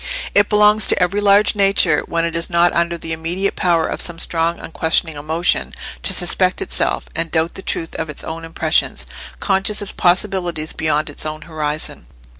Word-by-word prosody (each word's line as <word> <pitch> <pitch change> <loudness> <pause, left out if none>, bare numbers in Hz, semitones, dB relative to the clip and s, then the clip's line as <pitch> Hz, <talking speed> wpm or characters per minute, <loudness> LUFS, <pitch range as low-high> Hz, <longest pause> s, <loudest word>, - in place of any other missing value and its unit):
It 205 +1 +4
belongs 210 0 +5
to - - +3
every 190 +3 +1
large 205 +1 +4
nature, 195 -1 +3
when 165 0 0
it 170 0 -3
is 170 0 +1
not 175 0 +3
under 170 0 0
the 165 -1 -6
immediate 170 +5 -2
power 170 -3 +2
of - - 0
some 175 -1 -1
strong 165 0 0
unquestioning 160 0 -1
emotion, 150 - -1 0.3
to - - 0
suspect - - +1
itself, - - -1
and 165 0 -1
doubt 160 +1 0
the - - -8
truth 165 -3 -4
of 160 - -3
its 150 - -8
own 165 +1 -6
impressions, 160 - 0 0.3
conscious 195 - +1
of 205 - -4
possibilities 175 -4 0
beyond 155 -1 0
its - - -7
own 155 0 -5
horizon. 155 - -4
170 Hz, 180 wpm, -18 LUFS, 160-190 Hz, 0.3 s, belongs